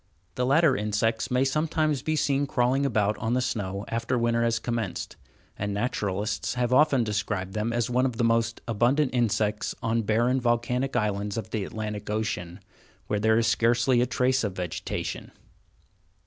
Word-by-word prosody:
The 125 0 -1
latter 145 0 +4
insects 105 +2 0
may 125 +1 +2
sometimes 155 0 0
be 155 +3 -1
seen 140 -1 +1
crawling 130 +2 +1
about 105 -4 0
on 115 +2 0
the - - +2
snow 100 -5 -3
after 115 +2 -1
winter 115 0 +1
has 115 0 +2
commenced, 115 -4 -3 0.4
and 100 0 -2
naturalists 105 -1 -2
have 125 0 0
often 140 -2 +4
described 105 -3 -2
them 110 +2 -1
as 120 -1 0
one 125 +1 +2
of 120 -3 -5
the 120 - +1
most 115 0 +1
abundant 125 +5 +2
insects 105 -3 0
on 115 0 +1
barren, 120 +5 +1
volcanic 125 +2 0
islands 105 -2 -1
of 110 - -5
the 110 -3 -1
Atlantic 105 -1 -5
Ocean, 100 -4 -3 0.4
where 105 - -1
there 110 +1 +3
is 115 - +2
scarcely 120 +2 +3
a 125 - +2
trace 130 +1 +1
of 100 -3 -2
vegetation. 90 -3 -4
115 Hz, 165 wpm, -26 LUFS, 105-125 Hz, 0.4 s, latter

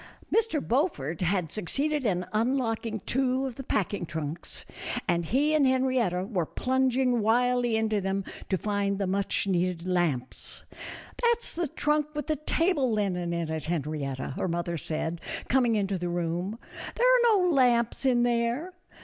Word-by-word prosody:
Mr. 435 -10 +1
Beaufort 225 - 0
had 180 -2 0
succeeded 275 - -1
in 180 -2 0
unlocking 225 -2 0
two 260 +3 0
of 260 - -3
the 270 - -8
packing 205 -5 -1
trunks, 160 0 -5 0.4
and 170 -2 +1
he 290 - +2
and 295 -3 +4
Henrietta 255 -8 +1
were 185 -7 -1
plunging 260 -1 +1
wildly 245 +1 +2
into 220 -2 +1
them 195 +1 -1 0.3
to 190 - +2
find 200 0 -1
the 200 - -1
much 195 +2 0
needed 180 -2 0
lamps. 170 -9 -1 0.6
"That's 475 -1 +1
the 340 -1 -1
trunk 300 +2 +1
with 295 -2 -2
the 310 - 0
table 305 -3 +1
linen 185 -5 0
in 170 -2 -2
it, 160 -1 -3
Henrietta," 150 -5 -2
her - - -1
mother 170 0 -2
said, 160 +1 -3 0.3
coming 245 -3 +3
into 195 -2 0
the 175 0 -2
room, 175 +4 -2 0.4
"there 485 - +2
are 480 -3 +5
no 360 -2 +3
lamps 245 -4 +3
in 250 -3 +3
there." 240 +8 0
220 Hz, 155 wpm, -28 LUFS, 175-265 Hz, 0.6 s, are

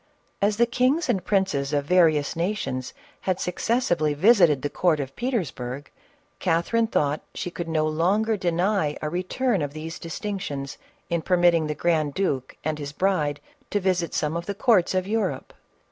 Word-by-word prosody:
As 205 +1 +2
the 235 - +5
kings 255 +7 +1
and 190 - +1
princes 180 -9 0
of 145 -1 +1
various 160 -3 +3
nations 165 -8 -2 0.2
had 185 -1 -1
succes 230 +7 0
sively 155 -5 +1
visited 175 - +5
the 145 - 0
court 170 -4 +2
of 135 -1 -5
Petersburg, 145 - -3 0.5
Catherine 185 +7 +1
thought 150 -8 0
she 180 - -4
could 170 -1 -5
no 155 -1 +1
longer 190 +8 +1
deny 175 -3 0
a 155 - -1
return 190 +4 0
of 145 -1 -3
these 160 +2 -6
distinctions, 165 -6 -5 0.3
in 170 -1 +1
permitting 175 -2 +3
the 150 - -2
grand 155 -4 0
duke 140 -10 -2
and 155 0 -2
his 145 0 -6
bride 150 -5 0 0.3
to 205 - 0
visit 180 -3 0
some 150 +1 0
of 170 0 -4
the 200 - -3
courts 200 -5 +3
of 185 0 +1
Europe. 220 +2 -2
175 Hz, 165 wpm, -25 LUFS, 150-200 Hz, 0.5 s, the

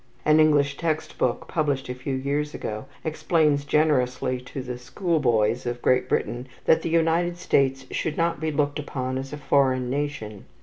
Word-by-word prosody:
An 155 +1 +5
English 145 -2 +4
text 160 -2 -2
book, 125 - 0
published 145 -4 -1
a 125 - -3
few 125 +2 -4
years 145 +3 -2
ago, 110 +3 -5 0.2
explains 155 -2 +1
generously 130 -4 +1
to 130 +1 -7
the 125 -1 -6
school 165 +6 -1
boys 120 -2 +1
of 120 0 -2
Great 125 +1 +2
Britain 125 +2 -1 0.2
that 160 - +4
the - - -2
United 165 +1 +2
States 135 -6 +1
should 155 -2 -2
not 170 0 +1
be 160 - -1
looked 145 0 0
upon 130 -3 -3
as 135 0 -7
a 150 - -5
foreign 130 -3 +2
nation. 135 -8 -4
140 Hz, 175 wpm, -25 LUFS, 125-155 Hz, 0.2 s, An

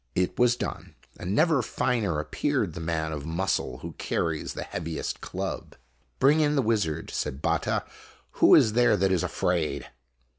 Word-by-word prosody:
O - - +4
It 90 - -2
was 120 0 +5
done, - - -6 0.2
and 90 +3 -2
never 155 0 +4
finer 105 -11 0
appeared 75 +2 -1
the 90 - -6
man 80 -1 -2
of 75 -2 -5
muscle 80 -5 -1
who - - -5
carries 80 -2 -2
the - - -4
heaviest 80 -3 -4
club. - - -5 0.4
"Bring 145 +4 +4
in 150 -1 +2
the 135 - +2
wizard," 100 -9 0
said 70 -2 -3
Batta, - - 0 0.6
"who - - +8
is 110 - +5
there 120 -2 +4
that 95 0 +2
is 90 -3 +2
afraid 85 -3 -1
90 Hz, 170 wpm, -27 LUFS, 80-120 Hz, 0.6 s, who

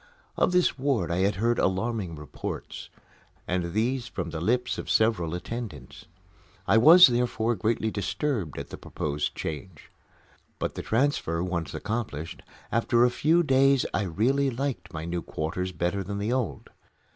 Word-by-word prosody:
Of - - +2
this 180 -6 +2
ward 130 -11 0
I 85 - 0
had 100 +2 +2
heard 115 +4 +1
alarming 95 -2 -1
reports 75 -2 -7 0.6
and 90 -1 -1
these 120 +3 0
from 90 -7 -5
the 80 0 -4
lips 120 +6 0
of - - -6
several 100 -7 +2
attendants. 115 +4 -7 0.6
I 115 - +5
was, 170 +8 +10
therefore, 120 -3 +1
greatly 110 +1 0
disturbed 105 - -2
at - - -7
the - - -8
proposed 75 0 -3
change. 80 0 -7 0.7
But, - - -3
the - - -5
transfer 110 - 0
once 85 -5 -3
accomplished, 105 -8 -4 0.3
after 115 +1 +3
a 125 - +2
few 165 +7 +3
days 135 -2 +4
I - - +1
really 120 +10 +1
liked 120 -8 -3
my 80 0 -5
new 85 0 -2
quarters 85 +5 -3
better 90 +3 -1
than 100 +2 -5
the 105 +4 -1
old. 130 -5 -3
110 Hz, 155 wpm, -27 LUFS, 85-125 Hz, 0.7 s, was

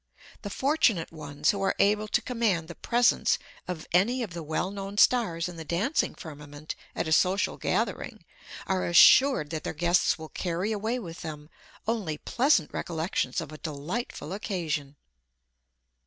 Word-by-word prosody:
The 205 - -5
fortunate 250 - +1
ones 150 -2 -1
who 200 - -4
are 195 - +1
able 210 +1 +2
to - - +1
command 220 -10 0
the 170 - -7
presence 240 +7 +2 0.3
of 180 -3 -5
any 235 +8 +2
of 195 -7 -6
the 170 - -5
well 160 +4 -2
known 200 0 -6
stars 185 -9 +3
in 175 -1 -8
the 165 - -6
dancing 190 - 0
firmament 150 -2 -8 0.2
at - - -2
a - - -3
social 185 +5 +2
gathering, - - -2 0.4
are 190 -1 0
assured 175 - +6
that 160 -2 -4
their - - -4
guests 175 -1 +2
will 160 -1 -9
carry 180 +4 -2
away 220 +3 -1
with 170 -9 -8
them 150 -1 -8 0.4
only 205 -10 -1
pleasant 245 - +2
recollections 160 -6 -2
of - - -8
a 155 - -10
delightful 170 - -5
occasion. 165 -8 -3
175 Hz, 155 wpm, -28 LUFS, 160-210 Hz, 0.4 s, assured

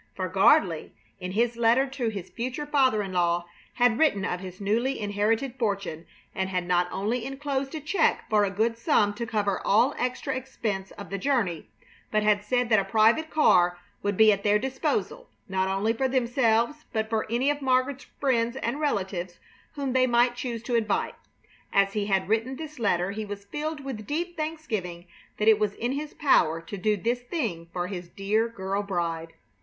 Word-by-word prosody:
For - - -2
Gardley, - - +3 0.3
in 180 0 -5
his 235 +2 +1
letter 235 +3 +4
to 265 -3 -3
his 195 -4 -7
future 255 +5 -4
father 260 -7 +2
in 190 -1 -6
law, 175 -1 +1 0.3
had 245 -1 +3
written 205 -12 +3
of 180 - -2
his 185 -1 -9
newly 230 +7 0
inherited 220 +5 0
fortune, 200 -7 -2 0.3
and 190 0 -2
had 180 -1 -1
not 175 0 +2
only 215 +5 -1
inclosed 270 +1 -3
a - - -3
check 320 +3 +1
for 210 -1 +3
a 200 - +1
good 225 +4 0
sum 215 -6 +3
to 235 +2 -5
cover 205 -4 0
all 230 +6 +4
extra 255 +2 -2
expense 220 -7 -4
of 200 - -10
the 200 - -2
journey, 195 - 0 0.4
but 215 0 +1
had 210 -1 +3
said 245 +2 0
that 215 -2 +5
a - - 0
private 225 +10 +3
car 175 - +4 0.2
would 205 -1 -1
be 220 -1 +7
at 200 -1 0
their 210 0 +4
disposal, 265 - -2 0.2
not 190 -1 0
only 195 +4 +1
for 265 +3 0
themselves, 245 +2 +1
but 220 -1 -1
for 220 -1 -1
any 255 +5 +2
of 290 0 -4
Margaret's 260 +1 +1
friends 240 -3 +1
and 270 +1 -2
relatives 190 - -2 0.4
whom 275 -3 -2
they 255 0 +4
might 240 0 +3
choose 235 -2 -4
to 245 - -4
invite. 220 -3 +1 0.6
As 195 0 +3
he 205 -1 -1
had 190 -2 +1
written 225 +5 0
this 305 -1 -8
letter 190 -4 +1
he 215 +2 -4
was 205 -1 -7
filled 300 +7 -4
with 220 -6 -6
deep 345 +4 -2
thanksgiving 225 - -4 0.3
that 210 - 0
it 220 -1 +6
was 210 -1 0
in 240 +2 -2
his 290 +2 -4
power 165 - +3
to 165 +5 -8
do 210 +2 +1
this 235 +5 -1
thing 230 - -3
for 175 -1 -2
his 180 -2 -6
dear 210 +5 0
girl 195 -3 -3
bride. 170 -4 -3
220 Hz, 190 wpm, -26 LUFS, 195-260 Hz, 0.6 s, be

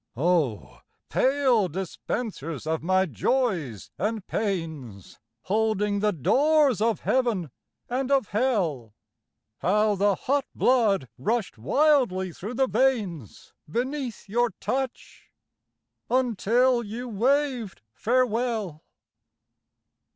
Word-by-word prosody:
Oh, 150 - 0 0.3
pale 260 -6 +3
dispensers 175 - -5
of 160 0 -1
my 185 +3 +2
Joys 160 - -1
and 215 -2 -2
Pains, 160 - -4 0.2
Holding 210 0 0
the 210 +1 +2
doors 275 - +3
of 225 -3 +1
Heaven 225 - 0 0.4
and 255 +2 -2
of 270 -7 +2
Hell, 180 - -1 0.6
How 210 +3 +2
the 200 0 +2
hot 275 +5 0
blood 215 - +2
rushed 220 - -1
wildly 195 - +2
through 215 +10 -7
the 265 +1 +2
veins 205 - -1 0.2
Beneath 255 - -3
your 240 +4 +1
touch, 265 -1 -4 0.8
until 245 0 +2
you 235 +3 -6
waved 245 - 0
farewell. 230 - 0
215 Hz, 95 wpm, -26 LUFS, 180-255 Hz, 0.8 s, pale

